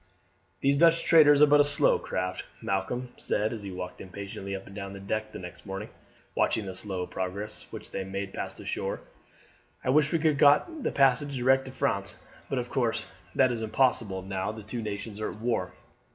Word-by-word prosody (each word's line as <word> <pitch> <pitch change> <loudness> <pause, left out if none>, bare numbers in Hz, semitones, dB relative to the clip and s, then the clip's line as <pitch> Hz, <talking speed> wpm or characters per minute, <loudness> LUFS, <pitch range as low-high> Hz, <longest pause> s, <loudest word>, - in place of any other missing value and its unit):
"These 140 +1 +3
Dutch 165 +1 +5
traders 150 -3 +7
are - - +11
but 145 0 +6
slow 145 0 +3
craft," 90 0 -3
Malcolm 120 +6 -2
said 105 +3 0
as 110 - -5
he 100 - -6
walked 90 -1 -6
impatiently 100 +1 -6
up 95 - -7
and 100 - -12
down 100 -1 -6
the 100 - -8
deck 110 +2 -3
next 90 -1 -8
morning, 95 +2 -6 0.4
watching 110 - +1
the 95 - -5
slow 95 -1 -4
progress 100 +4 -4
which - - -9
they 95 - -3
made 95 +1 -5
past - - -4
the - - -10
shore. - - -3 0.8
"I 130 - +2
wish 150 +1 +4
we 165 - +3
could 155 0 +3
have 145 - -3
got 145 +1 +6 0.2
a - - 0
passage 140 +1 +3
direct 130 +2 +3
to 130 - -7
France, 100 -5 -1 0.3
but - - -1
of - - -3
course - - 0 0.3
that 130 -2 +4
is 115 -2 -3
impossible 110 -4 +1
now 95 +1 -2
the 110 -1 -9
two 115 +3 -4
nations 105 0 -5
are 110 - -2
at - - -9
war." 115 -6 -1
110 Hz, 200 wpm, -28 LUFS, 95-135 Hz, 0.8 s, are